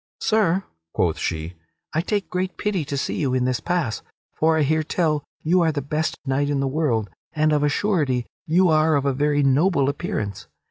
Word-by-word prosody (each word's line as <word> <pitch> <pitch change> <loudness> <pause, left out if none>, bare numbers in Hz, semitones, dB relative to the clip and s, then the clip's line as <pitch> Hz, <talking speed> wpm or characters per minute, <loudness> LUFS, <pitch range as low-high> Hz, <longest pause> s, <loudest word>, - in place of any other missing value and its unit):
"Sir," 195 -4 +2 0.3
quoth 85 -4 +1
she, 80 +1 -3 0.4
"I 160 - +1
take 200 +2 -1
great 185 +1 -2
pity 200 -6 -1
to 140 0 -3
see - - -2
you 130 -4 0
in 125 -1 +1
this 125 -2 0
pass, 170 -11 -1 0.3
for 160 0 +2
I 155 - +3
hear 155 +3 +2
tell 155 -2 0 0.2
you 175 +3 +3
are 165 -1 +3
the 145 -3 -3
best 155 +3 -2
knight 140 +1 0
in 145 -1 0
the 135 - 0
world 130 -7 0 0.3
and, 155 -1 +2
of 150 - +2
a 145 - +3
surety, 145 - 0 0.2
you 175 +3 +4
are 155 0 +4
of 140 -1 0
a 140 - +2
very 145 +1 +1
noble 140 +1 +3
appearance. 105 - -4
150 Hz, 200 wpm, -23 LUFS, 135-165 Hz, 0.4 s, you